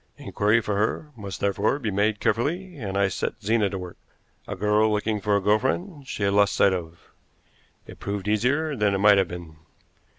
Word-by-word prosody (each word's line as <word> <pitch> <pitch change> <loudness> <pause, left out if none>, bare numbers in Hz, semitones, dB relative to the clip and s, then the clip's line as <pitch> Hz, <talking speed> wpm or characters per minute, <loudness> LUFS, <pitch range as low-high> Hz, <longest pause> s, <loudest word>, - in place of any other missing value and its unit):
Inquiry 105 +3 +1
for 105 -2 -2
her 110 +8 -1
must 100 -5 -7
therefore 100 +6 +1
be 115 -7 -3
made 105 +2 +1
carefully, 175 +10 -1
and 100 -8 -4
I 100 -1 +3
set 95 - -3
Zena 105 -1 +2
to 95 - -4
work 90 -2 -8 0.5
a 100 - -4
girl 105 +2 +2
looking 105 0 -1
for 105 +1 +1
a - - +3
girl 105 +2 +3
friend 145 - -3
she 105 - -4
had 100 0 +2
lost 100 0 +3
sight 100 -1 +4
of. 85 -2 -7 0.7
It - - -13
proved 100 -1 -4
easier 135 +9 +1
than 105 -4 +1
it - - +1
might 100 0 +6
have 95 - +1
been. 85 -3 -9
105 Hz, 200 wpm, -25 LUFS, 100-115 Hz, 0.7 s, might